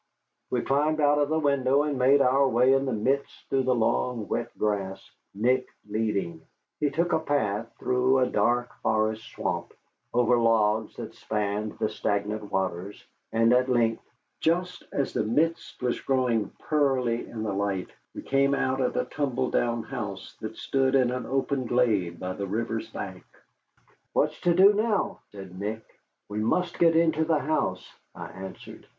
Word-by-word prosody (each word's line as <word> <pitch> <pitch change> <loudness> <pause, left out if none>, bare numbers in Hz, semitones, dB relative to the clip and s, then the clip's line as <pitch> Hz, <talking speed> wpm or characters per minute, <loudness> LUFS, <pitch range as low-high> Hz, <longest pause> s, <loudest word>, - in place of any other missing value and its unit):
We - - 0
climbed 150 +3 +1
out 145 0 +4
of 145 0 +1
the 160 - +1
window, 140 -2 +2
and 150 -1 -1
made 135 +2 +4
our 135 +1 +4
way 125 +3 +4
in 135 0 +1
the - - 0
mist 130 +6 -1
through 135 -1 +3
the 130 -1 +3
long, 115 0 0
wet - - -2
grass, 95 -2 -2 0.2
Nick 125 +5 +2 0.2
leading. 105 -6 -2 0.4
He 150 - +2
took 170 +3 0
a - - +3
path 115 -8 -1
through 125 +1 +2
a 130 - +4
dark 120 0 +1
forest 110 0 0
swamp, - - -3 0.4
over 120 0 +3
logs 110 -1 +2
that - - -7
spanned 105 0 -3
the 110 - 0
stagnant 105 0 -2
waters, 95 +1 -3 0.3
and 115 +1 +4
at 125 +1 +3
length, 115 -2 +2 0.4
just 180 +2 0
as 140 - -1
the - - +1
mist 155 +6 -1
was 125 -1 0
growing 125 -6 +1 0.2
pearly 130 -6 +1
in 110 -2 -5
the 105 -2 -2
light, 100 -2 -2 0.2
we - - -6
came 140 +1 +2
out 130 0 0
at 125 - 0
a - - +1
tumble 130 -1 -2
down 120 -1 0
house 100 -4 -6
that 110 0 -6
stood 135 0 +1
in 125 -2 +3
an 125 0 -4
open 135 -1 -1
glade 105 -9 +1
by 90 0 -3
the 100 +1 -4
river's 115 +2 -3
bank. - - -7 0.9
"What's - - 0
to 175 -1 +3
do 195 +3 +7
now?" 205 -2 0
said 95 -2 -10
Nick. 110 +2 -4 0.4
"We 105 +1 -4
must 175 +11 0
get 165 -1 +5
into 160 -1 +3
the 160 -1 +2
house," 135 -11 -2 0.2
I - - -7
answered. 95 0 -10
125 Hz, 170 wpm, -27 LUFS, 105-140 Hz, 0.9 s, do